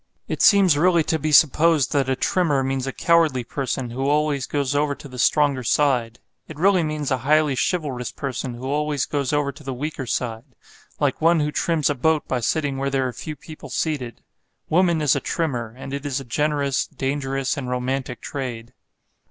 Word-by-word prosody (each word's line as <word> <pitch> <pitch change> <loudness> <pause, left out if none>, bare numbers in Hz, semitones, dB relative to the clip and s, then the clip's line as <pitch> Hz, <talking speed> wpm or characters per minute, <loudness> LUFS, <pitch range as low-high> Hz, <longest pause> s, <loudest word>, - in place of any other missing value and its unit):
It - - -3
seems 190 -7 +6
really 170 0 +4
to 160 +1 -1
be 155 +1 -1
supposed 155 0 +4
that 135 -2 +1
a 130 - +2
Trimmer 150 -2 +1
means 135 0 -2
a - - -1
cowardly 160 -5 +2
person 130 -1 -3
who 135 +3 -1
always 145 -2 +1
goes 140 -2 -1
over 145 0 +1
to 145 - -11
the 125 -2 -10
stronger 145 0 +3
side. 120 -2 +1 0.3
It 155 - -10
really 185 +2 +4
means 155 -3 -2
a 130 - +1
highly 150 +3 +3
chivalrous 130 - -1
person 130 -2 -4
who 125 +2 -8
always 145 0 0
goes 140 -3 -2
over 145 -1 +1
to 145 +2 -15
the 135 -2 -4
weaker 140 -1 -4
side; 120 +2 -4 0.4
like - - 0
one 165 +1 +4
who 150 0 0
trims 160 -1 0
a 145 - +2
boat 155 +3 +1
by 130 - -1
sitting 140 +2 -1
where 135 +1 -1
there 135 -1 0
are 125 - -5
few 155 +6 -7
people 155 +2 -11
seated. 135 -8 -3 0.5
Woman 170 -2 +2
is 145 - +3
a - - +1
trimmer; 125 -7 -2
and 135 +1 -8
it 140 0 -4
is 140 -2 -2
a 135 - -9
generous, 140 +2 0
dangerous 135 -1 -2
and 130 -3 -5
romantic 125 0 -3
trade. 120 -5 -6
140 Hz, 195 wpm, -22 LUFS, 130-150 Hz, 0.5 s, seems